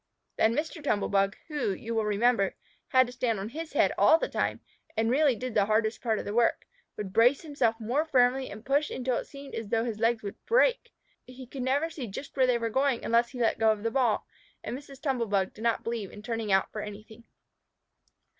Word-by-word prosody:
Then 225 Hz, +1 st, +3 dB
Mr. 315 Hz, +1 st, -3 dB
Tumble 210 Hz, -8 st, 0 dB
bug, 195 Hz, 0 st, +1 dB
who, 295 Hz, -, -1 dB
you 225 Hz, +5 st, -5 dB
will 220 Hz, -1 st, 0 dB
remember, 210 Hz, -1 st, +2 dB, 0.3 s
had 255 Hz, 0 st, +5 dB
to 245 Hz, -, -9 dB
stand 235 Hz, -4 st, -1 dB
on 200 Hz, +2 st, -4 dB
his 320 Hz, +5 st, -7 dB
head -, -, +3 dB
all 320 Hz, -, +7 dB
the -, -, -2 dB
time, -, -, -1 dB, 0.4 s
and 225 Hz, +1 st, +2 dB
really 280 Hz, -1 st, +4 dB
did 250 Hz, +2 st, -5 dB
the 200 Hz, -, +3 dB
hardest 220 Hz, +1 st, +1 dB
part 225 Hz, -3 st, 0 dB
of -, -, -5 dB
the 205 Hz, -, -4 dB
work, 235 Hz, +1 st, +2 dB, 0.3 s
would 195 Hz, -3 st, -5 dB
brace 245 Hz, +5 st, +4 dB
himself 280 Hz, -7 st, 0 dB
more 245 Hz, +7 st, 0 dB
firmly 260 Hz, -3 st, +2 dB
and 215 Hz, +2 st, -10 dB
push 285 Hz, +3 st, +1 dB
until 255 Hz, -1 st, -1 dB
it -, -, -5 dB
seemed 275 Hz, -1 st, -11 dB
as 225 Hz, -2 st, -4 dB
though 225 Hz, +1 st, +1 dB
his 220 Hz, -3 st, -4 dB
legs 230 Hz, 0 st, +1 dB
would 200 Hz, -, -7 dB
break. -, -, +3 dB, 0.4 s
He 255 Hz, +1 st, -10 dB
could 260 Hz, +2 st, -7 dB
never 280 Hz, +6 st, 0 dB
see 270 Hz, -7 st, -6 dB
just 220 Hz, +8 st, -8 dB
where 260 Hz, -2 st, +3 dB
they 250 Hz, -1 st, +3 dB
were 230 Hz, -1 st, -2 dB
going 265 Hz, 0 st, +1 dB
unless 235 Hz, +1 st, +3 dB
he 250 Hz, -, -9 dB
let 230 Hz, -1 st, +1 dB
go 220 Hz, -1 st, +5 dB
of 215 Hz, -1 st, -3 dB
the 230 Hz, -, 0 dB
ball, 245 Hz, -5 st, +1 dB, 0.4 s
and -, -, -4 dB
Mrs. 275 Hz, 0 st, -11 dB
Tumble 265 Hz, -5 st, -1 dB
bug 195 Hz, -2 st, 0 dB
did 215 Hz, -, -12 dB
not 230 Hz, -1 st, +1 dB
believe 230 Hz, -4 st, -3 dB
in 210 Hz, -, -11 dB
turning 225 Hz, -2 st, -3 dB
out 190 Hz, 0 st, +2 dB
for 215 Hz, -, -5 dB
anything. 215 Hz, +2 st, -10 dB
235 Hz, 230 wpm, -28 LUFS, 220-265 Hz, 0.4 s, all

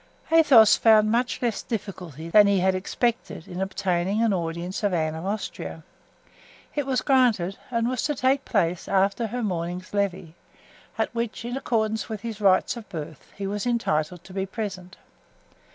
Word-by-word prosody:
Athos 280 Hz, -10 st, +7 dB
found 215 Hz, -1 st, +5 dB
much 245 Hz, +2 st, 0 dB
less 235 Hz, -3 st, 0 dB
difficulty 180 Hz, -, -6 dB
than 205 Hz, +4 st, +6 dB
he 200 Hz, -1 st, +3 dB
had 190 Hz, +1 st, +2 dB
expected 200 Hz, -1 st, -2 dB
in 180 Hz, 0 st, -6 dB
obtaining 190 Hz, +2 st, 0 dB
an 225 Hz, -3 st, +2 dB
audience 170 Hz, +1 st, -3 dB
of 205 Hz, -4 st, +1 dB
Anne 155 Hz, -2 st, 0 dB
of 160 Hz, +4 st, -5 dB
Austria. 210 Hz, +2 st, -5 dB, 0.9 s
It 290 Hz, -2 st, -2 dB
was 255 Hz, -2 st, 0 dB
granted, 230 Hz, -9 st, +2 dB
and 235 Hz, -2 st, 0 dB
was 250 Hz, -1 st, -1 dB
to 295 Hz, -, 0 dB
take 265 Hz, +1 st, +1 dB
place 180 Hz, -5 st, 0 dB
after 195 Hz, +3 st, +1 dB
her 245 Hz, +3 st, -4 dB
morning's 180 Hz, -1 st, -3 dB
"levee," 190 Hz, -5 st, -2 dB, 0.6 s
at -, -, -1 dB
which, 235 Hz, -1 st, -3 dB
in 245 Hz, +1 st, -3 dB
accordance 220 Hz, -4 st, -1 dB
with 215 Hz, -3 st, -5 dB
his 220 Hz, -2 st, -6 dB
rights 195 Hz, +4 st, +3 dB
of 235 Hz, -3 st, -10 dB
birth, 155 Hz, -5 st, -8 dB
he 200 Hz, -, -4 dB
was 205 Hz, +4 st, -3 dB
entitled 175 Hz, -8 st, -1 dB
to 185 Hz, -, -13 dB
be 195 Hz, 0 st, -2 dB
present. 190 Hz, -3 st, -6 dB
200 Hz, 170 wpm, -25 LUFS, 180-230 Hz, 0.9 s, Athos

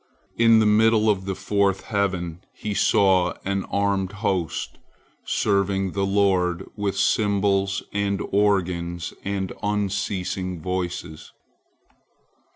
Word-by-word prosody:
In 115 Hz, -1 st, +5 dB
the 110 Hz, -, +4 dB
middle 110 Hz, +1 st, +4 dB
of 95 Hz, -2 st, -3 dB
the 95 Hz, -1 st, -2 dB
fourth 95 Hz, 0 st, 0 dB
heaven 90 Hz, -4 st, -2 dB
he 105 Hz, 0 st, -4 dB
saw 95 Hz, -3 st, +3 dB
an 100 Hz, 0 st, -1 dB
armed 100 Hz, -1 st, -1 dB
host, 95 Hz, -6 st, -2 dB, 0.5 s
serving 100 Hz, -2 st, 0 dB
the 100 Hz, +1 st, -1 dB
Lord 95 Hz, -3 st, +1 dB
with 100 Hz, -1 st, -2 dB
cymbals 100 Hz, -1 st, +1 dB
and 100 Hz, -1 st, 0 dB
organs 90 Hz, -4 st, 0 dB
and 95 Hz, -1 st, -3 dB
unceasing 95 Hz, -3 st, -2 dB
voices. 90 Hz, -2 st, -5 dB
100 Hz, 105 wpm, -23 LUFS, 95-100 Hz, 0.5 s, In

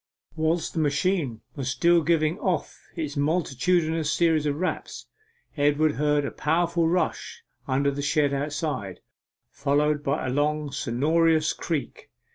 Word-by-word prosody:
Whilst 160 Hz, +1 st, 0 dB
the 165 Hz, -, -2 dB
machine 145 Hz, -, 0 dB
was 135 Hz, -3 st, -3 dB
still 170 Hz, +5 st, +3 dB
giving 160 Hz, +2 st, +1 dB
off 180 Hz, -8 st, -1 dB, 0.2 s
its 150 Hz, -2 st, -4 dB
multitudinous 160 Hz, +1 st, +1 dB
series 160 Hz, -3 st, +2 dB
of 145 Hz, -, 0 dB
raps, 185 Hz, +4 st, -4 dB, 0.5 s
Edward 150 Hz, +1 st, +2 dB
heard 150 Hz, 0 st, +1 dB
a -, -, -3 dB
powerful 170 Hz, +2 st, +1 dB
rush 175 Hz, +2 st, -2 dB, 0.2 s
under 140 Hz, +2 st, +1 dB
the 140 Hz, +1 st, -4 dB
shed 145 Hz, 0 st, +1 dB
outside, 140 Hz, -, -3 dB, 0.5 s
followed 145 Hz, +1 st, +1 dB
by 140 Hz, 0 st, -1 dB
a 130 Hz, -, -1 dB
long 150 Hz, +1 st, 0 dB
sonorous 155 Hz, +5 st, +2 dB
creak. 160 Hz, -5 st, -4 dB
150 Hz, 130 wpm, -25 LUFS, 140-165 Hz, 0.5 s, still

